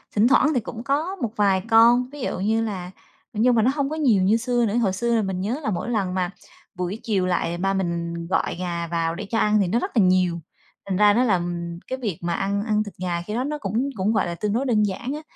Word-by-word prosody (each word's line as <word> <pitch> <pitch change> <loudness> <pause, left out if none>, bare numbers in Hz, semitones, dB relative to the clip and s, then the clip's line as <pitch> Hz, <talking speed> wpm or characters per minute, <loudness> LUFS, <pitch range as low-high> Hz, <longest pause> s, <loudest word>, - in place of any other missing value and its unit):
thỉnh 215 +2 +4
thoảng 280 +3 +4
thì 255 - +2
cũng 230 +1 -7
có 300 +8 -1
một 240 - -3
vài 195 -3 +2
con, 235 +3 +5
ví 290 0 -10
dụ 245 - -3
như 220 +4 +1
là 185 -5 -5 0.4
nhưng 235 +3 +3
mà 225 - +4
nó 250 - +3
hông 280 -2 0
có 310 - -3
nhiều 245 -12 +3
như 210 +4 +4
xưa 245 0 0
nữa. 210 0 -1
Hồi 205 -6 +1
xưa 235 +4 0
là 225 - +3
mình 190 -2 -3
nhớ 225 +9 -2
là 220 - -1
mỗi 195 - -3
lần 200 -6 -1
mà 180 -1 0 0.5
buổi 180 +4 -3
chiều 200 -5 0
lại, 175 -1 -1
ba 195 +2 0
mình 170 -3 -2
gọi 180 - 0
gà 170 -2 -3
vào 165 0 -1
để 205 - -6
cho 225 - -1
ăn 210 -1 +3
thì 190 - +1
nó 220 +7 +1
rất - - -3
là 210 - +6
nhiều. 180 -2 +2 0.5
Thành 190 -2 -2
ra 205 0 +6
nó 240 +4 +3
là, 225 -6 +2
ừm, 170 -1 -4
cái 260 - -3
việc 205 -10 -3
mà 170 0 -1
ăn 200 +3 -1
ăn 215 -1 +1
thịt 205 - -9
gà 175 -2 -1
khi 210 +5 -6
đó 245 +3 -1
nó 300 +2 -3
cũng 230 +3 -2
cũng 200 +3 0
gọi 215 - +1
là 170 - -4
tương 205 +3 -2
đối 250 +5 0
đơn 220 -5 +2
giản 210 +6 -2
á. 300 - -5
210 Hz, 275 wpm, -23 LUFS, 185-235 Hz, 0.5 s, là